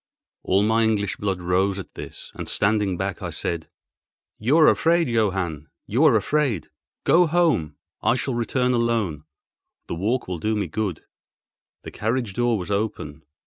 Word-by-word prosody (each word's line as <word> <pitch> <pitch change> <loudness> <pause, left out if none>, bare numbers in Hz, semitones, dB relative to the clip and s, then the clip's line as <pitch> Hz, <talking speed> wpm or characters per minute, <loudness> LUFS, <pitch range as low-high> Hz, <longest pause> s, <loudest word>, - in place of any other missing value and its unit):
All 95 +2 +2
my 110 +2 +3
English 105 -3 0
blood 95 -3 -2
rose 95 +2 +1
at 95 - -8
this, - - -9
and, - - -6
standing 100 -3 +1
back, 95 0 -3
I - - -3
said: 85 -2 -3 0.7
"You 125 +9 +3
are 160 - +7
afraid, 170 0 +3
Johann—you 95 - -1
are 140 -7 +6
afraid. 115 - 0 0.3
Go 175 0 +5
home; 160 - +1 0.3
I 120 - +3
shall 130 +1 -2
return 125 +2 0
alone; 115 -11 0 0.6
the - - -5
walk 110 +9 -1
will 90 -2 -4
do 110 +6 0
me 105 - 0
good." 105 -6 -3 0.8
The - - -8
carriage 115 -1 -2
door 120 +1 +1
was 95 +1 -5
open. 80 -8 -3
105 Hz, 155 wpm, -23 LUFS, 95-120 Hz, 0.8 s, are